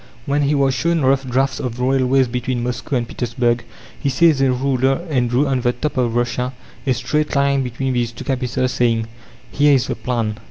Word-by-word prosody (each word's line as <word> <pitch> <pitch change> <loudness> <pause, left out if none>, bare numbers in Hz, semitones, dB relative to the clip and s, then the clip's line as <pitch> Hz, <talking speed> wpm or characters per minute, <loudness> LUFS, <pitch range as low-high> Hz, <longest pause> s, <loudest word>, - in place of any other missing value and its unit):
When 145 +1 +1
he 145 +1 +2
was 135 -1 +2
shown 165 +5 +1
rough 135 0 +2
drafts 130 +1 0
of 125 -1 -4
railways 130 0 +2
between 125 0 -2
Moscow 125 +3 -3
and 120 -2 -1
Petersburg, 120 0 -1 0.4
he 140 - 0
seized 150 +1 +3
a 135 -1 +3
ruler 135 +4 0
and 125 -4 +1
drew 125 +5 +2
on 135 -2 0
the 120 - +2
map 150 +2 -2
of 120 -3 0
Russia 125 +1 -1 0.3
a 130 - +4
straight 150 +5 -1
line 140 0 +2
between 130 +1 -2
these 120 -2 0
two - - -9
capitals, 130 -1 -1
saying, 115 -3 +1 0.5
"Here 145 0 +4
is 130 - +1
the - - -3
plan." 115 -4 -2
130 Hz, 200 wpm, -19 LUFS, 120-135 Hz, 0.5 s, a